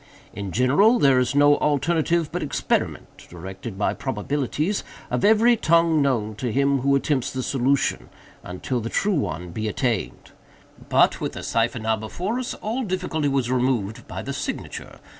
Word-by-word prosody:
In 100 -1 -5
general, 145 - +4
there 135 - +4
is 125 +2 0
no 145 0 +5
alternative 160 +2 +1
but - - -3
experiment - - -2
(directed 95 +4 -8
by 100 - 0
probabilities) 140 - -2 0.3
of - - -1
every 220 +3 +5
tongue 165 -5 +3
known 115 -6 0
to 125 0 -2
him 140 +2 +2
who 140 +2 +2
attempts 140 -2 0
the 130 -1 -3
solution, 135 +1 0 0.3
until 90 +8 -3
the 115 0 -4
true 205 - +1
one 90 - -2
be 110 +5 -3
attained. 115 -1 -2 0.6
But, - - +3
with - - -3
the - - -7
cipher 115 +1 0
now 110 -1 0
before 180 - -3
us, 255 - -4
all 230 +5 -3
difficulty 180 -7 -2
was 135 -3 0
removed 125 -5 -1
by - - -6
the - - -4
signature. - - -6
135 Hz, 160 wpm, -23 LUFS, 115-160 Hz, 0.6 s, no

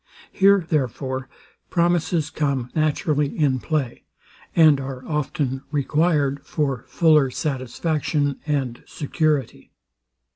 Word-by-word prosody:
Here, 195 -2 +4
therefore, 130 -2 -2 0.4
promises 170 -2 +1
come 140 -5 -1
naturally 150 -2 0
in 140 -4 +2
play, 145 -4 -2 0.5
and 155 -4 +6
are 130 -1 -7
often 140 -3 -2
required 145 -1 +1
for 135 -7 -2
fuller 155 -5 +4
satisfaction 145 +2 -1
and 135 -5 -1
security. 150 -1 -2
145 Hz, 95 wpm, -23 LUFS, 135-155 Hz, 0.5 s, and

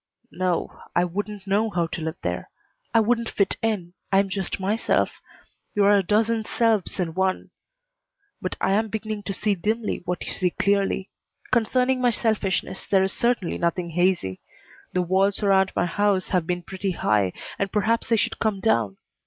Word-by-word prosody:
"No, 185 -1 -2
I 175 - +4
wouldn't 205 +2 -4
know 205 +3 +2
how 175 -4 0
to 165 - -5
live 160 +1 -3
there. - - -3 0.4
I 230 - +5
wouldn't 230 +1 +1
fit 200 -2 +1
in. 200 -6 -1 0.2
I 195 - +4
am 195 0 +3
just 190 0 -3
myself. 205 +4 0 0.5
You 205 - +3
are 205 +1 +6
a 200 - +4
dozen 220 +4 +1
selves 220 -4 +1
in 170 -3 -1
one. 190 +1 -1 0.9
But - - -3
I - - +1
am 215 +3 +2
beginning 215 0 -4
to 200 - -2
see 210 +2 +1
dimly 215 +4 -1
what 180 0 -3
you - - -4
see 185 -1 +1
clearly. 195 +1 0 0.4
Concerning 255 +2 +2
my 245 - +4
selfishness 215 -5 0
there 190 -1 +4
is 190 - 0
certainly 235 -7 0
nothing 170 0 -1
hazy. 175 - +1 0.5
The 180 - +1
walls 195 +4 +1
around 195 -1 +4
my - - +2
house 200 +1 +1
have 180 -4 +1
been 175 -1 -1
pretty 190 +1 -3
high, 105 - +2 0.3
and 195 -1 -1
perhaps 220 +3 +1
they 230 - +5
should - - -1
come 215 -3 0
down. 110 - +1
195 Hz, 180 wpm, -24 LUFS, 180-215 Hz, 0.9 s, are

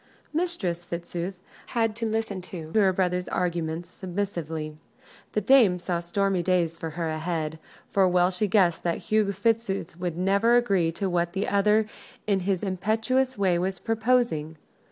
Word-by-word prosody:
Mistress 260 - -1
Fitzooth 175 +2 -4 0.4
had 225 -2 +2
to 230 -1 -1
listen 220 -3 -2
to 170 -3 -8
her 200 -3 +4
brother's 180 -1 0
arguments 170 -1 -2
submissively. 170 -5 -4 0.6
The 210 - +1
dame 215 -5 +5
saw 175 -1 -2
stormy 185 +2 0
days 175 -2 +1
for 165 -1 -5
her 170 -1 -1
ahead, 160 0 -2 0.3
for 195 -2 +3
well 180 0 +3
she 190 +3 0
guessed 185 -4 +3
that 170 -1 0
Hugh 215 -2 +1
Fitzooth 195 -4 -1
would 175 -2 -3
never 200 +6 +3
agree 195 -9 +2
to 195 - -1
what 175 -1 0
the 195 +1 -1
other 210 +2 +3 0.4
in 200 -2 +2
his 190 0 -1
impetuous 220 +7 0
way 185 -3 +2
was 190 +1 -1
proposing. 225 -9 0
185 Hz, 155 wpm, -26 LUFS, 170-210 Hz, 0.6 s, dame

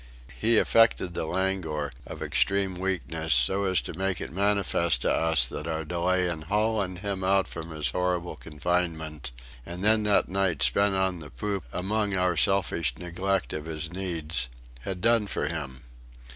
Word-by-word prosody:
He 115 +1 +2
affected 115 -7 +4
the 80 - -3
languor 90 -6 -1 0.2
of - - -6
extreme 100 -1 +1
weakness, 80 -5 0
so 95 +12 +3
as 95 -1 +2
to - - -6
make 95 +1 -1
it - - -5
manifest 95 -7 +2
to - - +2
us 80 -6 +2
that 75 - -5
our 80 -1 -2
delay 90 +2 +1
in 85 -3 -3
hauling 100 +1 0
him 95 +1 -3
out 95 0 +3
from 85 -1 -7
his 75 -5 -1
horrible 90 0 -1
confinement, 80 -3 -2 0.3
and 85 +6 -7
then 110 +1 +4
that 105 -1 +3
night 95 -2 +1
spent 100 -1 +3
on 95 -2 0
the 75 -2 -9
poop 100 -2 -3
among 100 +1 -1
our 90 -1 +2
selfish 85 0 +1
neglect 90 +2 -2
of 75 +1 -5
his 80 0 -4
needs, 80 -8 -2 0.3
had 90 +6 -5
"done 115 -1 +3
for 75 - -1
him." 70 -4 -5
90 Hz, 165 wpm, -27 LUFS, 80-95 Hz, 0.3 s, affected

